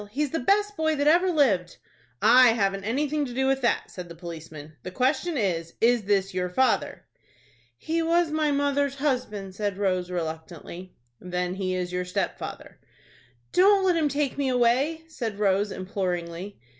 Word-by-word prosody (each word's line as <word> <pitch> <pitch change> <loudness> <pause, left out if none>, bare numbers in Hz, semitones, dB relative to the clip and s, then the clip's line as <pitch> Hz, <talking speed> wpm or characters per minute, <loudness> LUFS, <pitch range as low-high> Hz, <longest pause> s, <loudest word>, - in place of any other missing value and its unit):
He's 280 +5 -2
the 325 - -1
best 415 +8 +1
boy 315 -2 +1
that 285 0 0
ever 345 +5 +4
lived." 230 - +1 0.5
"I 250 -2 +7
haven't 195 -3 -1
anything 290 +6 0
to 245 - -8
do 265 +1 +1
with 270 0 +1
that," 240 - 0
said 180 -2 -8
the 170 - -9
policeman. 160 -3 -9
"The - - -6
question 275 - 0
is, 170 -6 -2
is 235 -2 +3
this 195 -1 +1
your 180 0 -1
father?" 255 +8 0 0.7
"He 330 - -1
was 335 0 +2
mother's 285 -2 +1
husband," 250 -9 -2
said 205 -1 -3
Rose, 185 -3 0
reluctantly. 170 +1 -6 0.2
"Then 180 0 -3
he 185 -1 -2
is 180 -1 -3
your 180 0 -1
stepfather." 180 - -5 0.7
"Don't 390 +1 +5
let 365 -2 +3
him 310 -3 +1
take 285 -1 -1
me 275 -2 +1
away," 255 +6 +2
said 230 -10 -5
Rose, 200 0 +1
imploringly. 185 -1 -4
225 Hz, 160 wpm, -26 LUFS, 185-290 Hz, 0.7 s, I